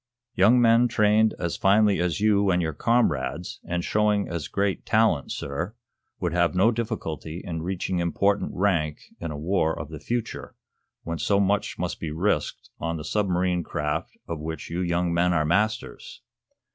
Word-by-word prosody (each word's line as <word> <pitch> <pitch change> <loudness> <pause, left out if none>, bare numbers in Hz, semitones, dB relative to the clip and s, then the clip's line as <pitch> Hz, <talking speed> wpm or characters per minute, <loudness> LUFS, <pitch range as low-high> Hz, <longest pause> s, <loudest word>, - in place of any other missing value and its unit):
Young 110 +7 +5
men 115 +1 +5
trained 110 -1 +3
as 85 -2 -3
finely 100 0 +4
as 90 +1 0
you 100 -1 +3
and 90 -1 +3
your 80 -2 -1
comrades, 80 - 0
and 85 0 -2
showing 105 0 +1
as 85 -4 -4
great 100 -1 -1
talent, 110 -10 +2
sir, 85 +10 -4 0.4
would 85 -2 -1
have 85 +1 +2
no 100 +6 +4
difficulty 95 - -4
in 80 -3 -4
reaching 90 +1 -2
important 100 +4 +1
rank 85 -6 0 0.2
in 85 - -4
a 75 - -5
war 80 0 0
of 75 0 -6
the 80 -2 -8
future, 120 +7 -4 0.5
when 85 -1 -4
so 100 +6 +2
much 100 0 0
must - - -3
be 80 - -4
risked 80 0 -1
on 85 0 -2
the 75 - -6
submarine 90 -1 0
craft 75 -1 -3
of 85 -2 -4
which 80 +2 -6
you 85 - -2
young 85 -1 0
men 85 +1 +2
are 80 -2 +2
masters." 105 +7 -1
90 Hz, 170 wpm, -25 LUFS, 80-105 Hz, 0.5 s, Young